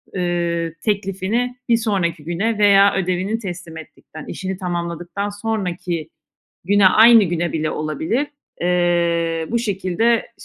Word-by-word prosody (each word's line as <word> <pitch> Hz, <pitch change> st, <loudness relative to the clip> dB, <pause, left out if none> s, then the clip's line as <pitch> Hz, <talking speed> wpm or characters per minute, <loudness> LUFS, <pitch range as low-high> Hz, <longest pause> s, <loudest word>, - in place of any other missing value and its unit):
ııı, 170 Hz, -2 st, -1 dB
teklifini 205 Hz, +4 st, -1 dB
bir 230 Hz, -, +5 dB
sonraki 190 Hz, -9 st, -1 dB
güne 200 Hz, +7 st, -1 dB
veya 200 Hz, -1 st, +5 dB
ödevini 190 Hz, +3 st, -1 dB
teslim 175 Hz, -5 st, -7 dB
ettikten, 155 Hz, 0 st, -12 dB
işini 190 Hz, 0 st, -5 dB
tamamladıktan 175 Hz, +1 st, -4 dB
sonraki 185 Hz, -6 st, -3 dB, 0.6 s
güne, 200 Hz, 0 st, +5 dB
aynı 225 Hz, +2 st, +7 dB
güne 170 Hz, -1 st, -2 dB
bile 155 Hz, -1 st, -1 dB
olabilir. 160 Hz, -, -2 dB, 0.3 s
Eee, 170 Hz, -2 st, +1 dB
bu 235 Hz, -, +1 dB
şekilde 215 Hz, +2 st, 0 dB
185 Hz, 115 wpm, -20 LUFS, 170-205 Hz, 0.6 s, aynı